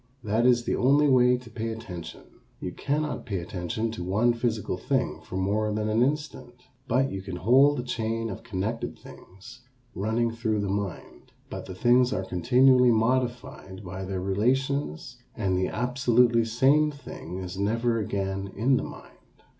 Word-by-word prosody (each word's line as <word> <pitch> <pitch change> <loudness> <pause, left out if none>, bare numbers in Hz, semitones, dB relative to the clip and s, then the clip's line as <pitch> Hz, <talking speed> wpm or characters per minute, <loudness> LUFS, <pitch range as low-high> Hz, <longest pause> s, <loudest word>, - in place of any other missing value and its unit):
That 110 +3 +2
is 120 -1 +4
the - - -1
only 140 +4 +4
way 125 -2 +5
to 125 -1 -13
pay 115 +1 -4
attention. 90 -8 -8 0.4
You 90 - -4
cannot 150 +8 -2
pay 100 -4 -2
attention 90 +5 -3
to 100 -6 -6
one 105 +7 +2
physical 115 -5 -2
thing 125 - -1
for 85 +4 -7
more 105 +3 0
than 105 0 -1
an 110 +2 +2
instant. 145 -2 -2 0.3
But 135 +2 +1
you 95 - -4
can 95 -1 -6
hold 130 +10 +4
a - - -2
chain 115 -2 -2
of - - -7
connected 110 +4 -4
things 95 +7 -14 0.3
running 115 +3 0
through 110 -2 -1
the 100 - -2
mind, 100 -2 -5 0.2
but - - -6
the 95 - -7
things 120 +5 +4
are 95 - -2
continually 125 +7 +4
modified 120 -4 -1
by 95 +1 -6
their 95 -1 -3
relations 120 - -1 0.2
and 95 -4 0
the 90 0 +1
absolutely 120 -1 +2
same 135 +7 +3
thing 140 - -8
is 95 0 -6
never 115 +3 +1
again 95 -1 -3
in 130 +5 +2
the - - -2
mind. - - -11
115 Hz, 165 wpm, -26 LUFS, 95-125 Hz, 0.4 s, way